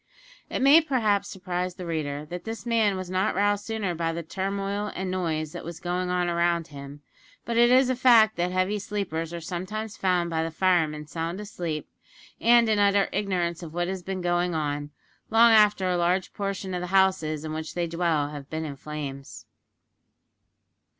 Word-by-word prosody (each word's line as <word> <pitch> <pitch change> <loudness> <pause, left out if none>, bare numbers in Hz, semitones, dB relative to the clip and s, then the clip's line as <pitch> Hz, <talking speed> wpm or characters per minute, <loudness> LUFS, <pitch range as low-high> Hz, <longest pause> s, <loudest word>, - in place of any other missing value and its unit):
It - - -2
may 290 +4 +8
perhaps 220 -9 +1
surprise 180 -1 -4
the 180 - -7
reader 150 -3 -3
that 175 0 -5
this 225 +1 -6
man 220 -4 +2
was 185 -1 -6
not 185 +3 +1
roused 205 +1 +1
sooner 220 -5 -2
by 165 0 -1
the 170 +1 -4
turmoil 195 +4 -3
and 190 -1 -3
noise 160 -4 -2
that - - -7
was 170 -1 -7
going 180 +1 -2
on 180 -1 +1
around 170 -1 +1
him, 140 0 -10 0.4
but 235 - -2
it 240 +1 +5
is 255 +1 +5
a 255 - +1
fact 230 -3 +5
that 175 +1 -1
heavy 185 +3 0
sleepers 190 -6 -3
are 170 - -5
sometimes 195 +6 -5
found 180 -2 +1
by 160 -1 0
the 165 - -2
firemen 160 -3 +1
sound 165 +4 -4
asleep, 175 -7 -5 0.5
and 235 0 +5
in 215 -1 +2
utter 200 -1 +3
ignorance 180 -4 -1
of 165 -2 -9
what 175 0 0
has 190 0 -4
been 190 +1 -4
going 175 0 0
on, 145 -1 -2 0.4
long 230 +1 +6
after 210 -3 +5
a 180 -1 +1
large 175 +2 0
portion 195 -2 -4
of 180 - -2
the 180 - -4
houses 180 -5 +2
in 155 - -4
which 155 0 -5
they 175 -1 0
dwell 165 -3 0
have 145 -2 -9
been 160 0 -3
in 145 -2 -5
flames. 140 -2 -7
180 Hz, 190 wpm, -26 LUFS, 165-205 Hz, 0.5 s, may